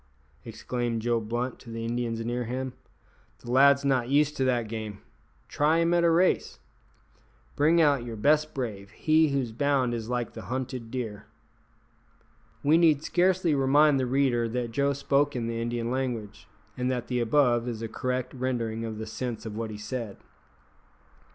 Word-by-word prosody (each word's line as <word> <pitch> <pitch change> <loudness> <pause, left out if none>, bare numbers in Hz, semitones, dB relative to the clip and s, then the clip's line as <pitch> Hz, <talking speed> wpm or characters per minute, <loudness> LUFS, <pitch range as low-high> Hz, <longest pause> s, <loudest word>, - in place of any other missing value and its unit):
exclaimed 120 -2 -3
Joe 120 +1 +1
Blunt 120 +3 -3
to 120 - -13
the 115 0 -5
Indians 115 -1 -2
near 120 +1 -2
him, 130 +2 -4 0.6
"the 120 - -8
lad's 140 +2 +5
not 130 -3 +1
used 150 +1 +3
to 135 - +1
that 120 -3 +1
game; 110 -2 -5 0.5
try 150 +3 +2
him 170 +1 +2
at 170 0 +3
a 170 - +5
race. 175 +3 +2 1.0
Bring 160 +4 +4
out 145 -6 +3
your 120 -1 -6
best 150 +7 +2
brave 105 -7 -4
he 155 +5 +2
whose 135 -4 -1
bound 130 0 +1
is 115 -1 -4
like 120 -2 -2
the - - -9
hunted 125 -2 -4
deer." 115 -5 -5 1.4
We 155 +3 +5
need 155 -4 +4
scarcely 180 -2 +2
remind 140 +1 +4
the 130 - 0
reader 125 -3 +1
that 120 0 -3
Joe 140 +4 +1
spoke 140 +1 +1
in 120 -2 -2
the 115 0 -3
Indian 120 0 -2
language, 125 -6 -4 0.3
and 125 0 -1
that 125 -2 -2
the 125 -1 -1
above 120 0 +2
is 115 -2 -4
a - - -2
correct 125 +2 -3
rendering 120 -3 -2
of 110 -1 -5
the 110 - -5
sense 115 0 -5
of 110 -2 -6
what 115 0 -3
he 105 - -7
said. 110 -1 -5
125 Hz, 170 wpm, -27 LUFS, 115-140 Hz, 1.4 s, lad's